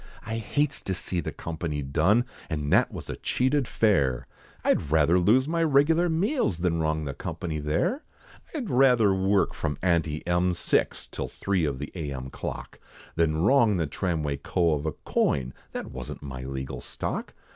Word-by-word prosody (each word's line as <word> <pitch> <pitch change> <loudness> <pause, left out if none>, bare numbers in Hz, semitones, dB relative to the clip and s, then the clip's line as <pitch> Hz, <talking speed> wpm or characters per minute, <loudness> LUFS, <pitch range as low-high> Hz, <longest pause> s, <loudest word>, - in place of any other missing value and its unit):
I 110 +1 -3
hates 145 +6 0
to 95 - -2
see 90 0 -2
the 85 - -3
company 80 -3 -4
done, 85 - +3 0.2
And 75 -3 -1
that - - +4
was - - -7
a - - -5
cheated 130 0 +1
fare, 70 - +2 0.4
I'd 75 - +1
rather 80 +3 +4
lose 120 +9 +4
my 165 +1 0
regular 160 +3 +4
meals, 180 - +1
Than 85 -2 +1
wrong 80 -1 0
the 70 - -3
company, 80 +2 -4
there! 75 - 0 0.5
I'd 255 -9 -3
rather 125 -6 +5
work 95 +1 +2
from 75 -2 -3
ante 80 -4 +1
M, 90 +1 +2
six - - 0
Till - - -5
three 95 -5 -1
of 70 -3 -2
the 75 +2 -6
A.M. 70 -6 -5
clock, - - -6 0.4
Than 80 -1 +1
wrong 115 -3 +4
the 85 - +1
tramway 75 -2 -2
co. 85 +3 +1
of 75 +1 -2
a 80 - -1
coin, 65 -1 0 0.2
That - - -5
wasn't 65 +3 -7
my 65 -2 -6
legal 65 0 -5
stock. - - -4
85 Hz, 170 wpm, -27 LUFS, 75-115 Hz, 0.5 s, rather